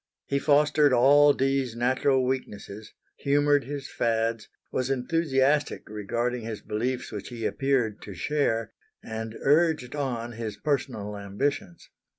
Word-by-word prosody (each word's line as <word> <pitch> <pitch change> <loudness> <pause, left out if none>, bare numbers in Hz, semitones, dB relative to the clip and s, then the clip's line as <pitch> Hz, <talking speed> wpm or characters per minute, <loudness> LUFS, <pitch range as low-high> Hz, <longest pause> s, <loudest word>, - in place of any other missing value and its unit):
He 140 - 0
fostered 150 0 +4
all 145 +4 +6
Dee's 135 -3 0
natural 130 +2 +2
weaknesses, 110 -4 -5 0.3
humoured 145 0 +2
his 140 -1 -5
fads, 115 -1 -1 0.2
was 130 0 -1
enthusiastic 135 +1 +1
regarding 115 +4 -2
his 110 -1 -5
beliefs 120 +4 -2
which 105 -3 -6
he 115 -2 -5
appeared 130 -6 0
to 100 - -9
share, 115 - -1 0.3
and 110 0 -6
urged 150 -3 +2
on 120 -5 -3
his 110 -2 -5
personal 125 -8 -2
ambitions. 100 0 -3
125 Hz, 125 wpm, -27 LUFS, 110-140 Hz, 0.3 s, all